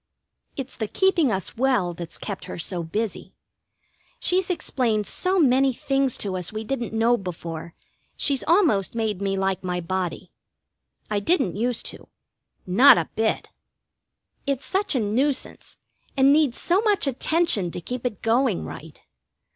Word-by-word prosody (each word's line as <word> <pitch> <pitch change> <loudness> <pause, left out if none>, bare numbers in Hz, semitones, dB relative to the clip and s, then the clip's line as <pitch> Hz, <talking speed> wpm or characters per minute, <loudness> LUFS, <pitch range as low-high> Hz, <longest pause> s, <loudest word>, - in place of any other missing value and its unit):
It's 270 -3 -6
the 220 - -3
keeping 340 - +2
us 190 -2 -3
well 240 -8 +1
that's 170 0 -8
kept 200 -3 -6
her - - -7
so 175 +1 -2
busy. 205 +6 -4 0.8
She's 370 +1 +2
explained 235 - 0
so 370 - 0
many 265 -2 +4
things 270 +1 0
to 190 -2 -2
us 180 -1 -3
we 215 0 -4
didn't 240 0 -3
know 230 +2 +3
before, 170 -3 -7 0.4
she's 275 -3 +1
almost 315 - +3
made 215 -4 -1
me 195 -1 -1
like 190 0 -1
my 180 -1 -2
body. 180 0 -3 0.8
I 210 - +1
didn't 200 - +1
use 235 +2 -1
to. - - -8 0.6
Not 240 +9 +7
a 165 - -1
bit. 220 0 0 1.0
It's 275 -1 -1
such 385 +2 0
a - - +3
nuisance, 255 +6 -1 0.4
and 270 +1 +6
needs 295 -5 +2
so 360 +3 +2
much 420 -6 +2
attention 275 - +1
to 175 - -5
keep 245 +8 -6
it 240 -6 -4
going 230 -3 +1
right. 160 -1 -10
230 Hz, 150 wpm, -24 LUFS, 190-275 Hz, 1.0 s, Not